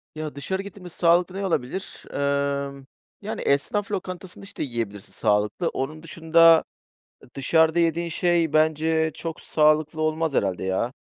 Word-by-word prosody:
Ya, 155 -2 -5
dışarı 190 +7 -3
gittiğimde 200 -2 -10
sağlıklı 175 +2 +2
ne 195 0 -2
olabilir? 170 +2 -3
Emm, 140 -1 -1 0.4
yani, 210 +2 -5
esnaf 200 +9 0
lokantasında, 185 -2 -6
işte, 200 +1 -6
yiyebilirsin 115 -6 -5
sağlıklı. 105 - +1
Onun 155 +4 -4
dışında, 165 0 +5 0.6
ı - - -15
dışarıda 160 +4 +3
yediğin 170 0 +1
şey 170 -2 +1
bence 160 +1 +2
çok 165 -1 -6
sağlıklı 155 0 +2
olmaz 155 0 0
herhâlde 95 -7 0
ya. 95 +7 -1
160 Hz, 135 wpm, -24 LUFS, 140-170 Hz, 0.6 s, dışında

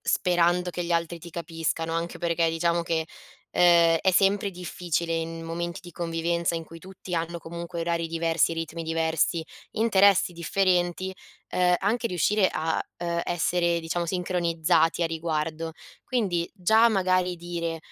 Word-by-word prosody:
sperando 175 -1 +2
che 175 - -4
gli 170 - -5
altri 170 0 -1
ti 170 +1 -11
capiscano, 165 -1 -3
anche 165 +1 -3
perché 170 -1 +1
diciamo 170 +1 +1
che, 165 -1 -1 0.4
ehm, 170 -2 +5
è 190 - +3
sempre 195 +2 +3
difficile 175 -2 -3
in 165 0 -3
momenti 170 +1 -4
di 175 -1 -12
convivenza, 170 0 -1
in 165 - -5
cui 165 +1 -12
tutti 185 -1 -8
hanno, 170 +1 -2
comunque, 170 +1 -6
orari 170 0 -1
diversi, 165 0 +1
ritmi 165 0 -4
diversi, 160 0 0 0.3
interessi 200 -4 +4
differenti, 180 +1 0 0.3
ehm, 180 0 +3
anche 230 +4 0
riuscire 190 +2 +2
a, 160 +1 -1
ehm, 170 0 -2
essere, 175 0 +1
diciamo, 170 +1 -2
sincronizzati 170 -2 +1
a - - +3
riguardo. 160 0 -2 0.3
Quindi 190 -9 -1
già, 220 +4 +4
magari, 185 -3 +1
dire: 170 -1 -4
170 Hz, 145 wpm, -26 LUFS, 165-180 Hz, 0.4 s, ehm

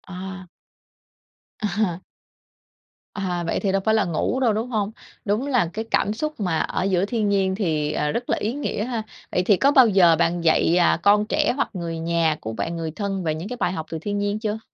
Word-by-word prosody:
À. 190 0 -8 1.1
À. 200 -4 -1 1.1
À, 180 -4 -2
vậy 165 - -1
thì 195 - 0
đâu 195 0 +1
phải 220 - +3
là 220 - +2
ngủ 175 +9 -1
đâu, 240 -5 +3
đúng 225 +4 -2
hông? 215 -3 -1 0.3
Đúng 215 +7 0
là 245 -11 +2
cái 220 +1 -4
cảm 210 - +2
xúc 305 +5 -4
mà 180 -6 0
ở - - -1
giữa 190 -1 +1
thiên 215 -1 -1
nhiên 190 -1 +1
thì, 155 -7 0
à, 150 -1 -1
rất 240 +1 -3
là - - +2
ý 220 +3 -2
nghĩa 280 -6 -2
ha. 235 -3 -3 0.3
Vậy 180 - +1
thì 200 +1 +4
có 275 +7 +4
bao 260 -4 +7
giờ 185 -5 +5
bạn 170 +1 +1
dạy, 165 +1 +3
à, 170 -1 +3
con 205 +1 +5
trẻ 225 - +1
hoặc 280 - 0
người 170 -3 -4
nhà 165 -1 +1
của 110 - -5
bạn, 165 +9 -3
người 160 -1 -3
thân 195 +1 -3
về 155 -2 0
những 165 +5 -6
cái 250 - -5
bài 180 - 0
học 160 -3 -4
từ 165 - -3
thiên 205 +5 -3
nhiên 205 +1 -1
chưa? 215 0 -2
195 Hz, 225 wpm, -23 LUFS, 170-215 Hz, 1.1 s, bao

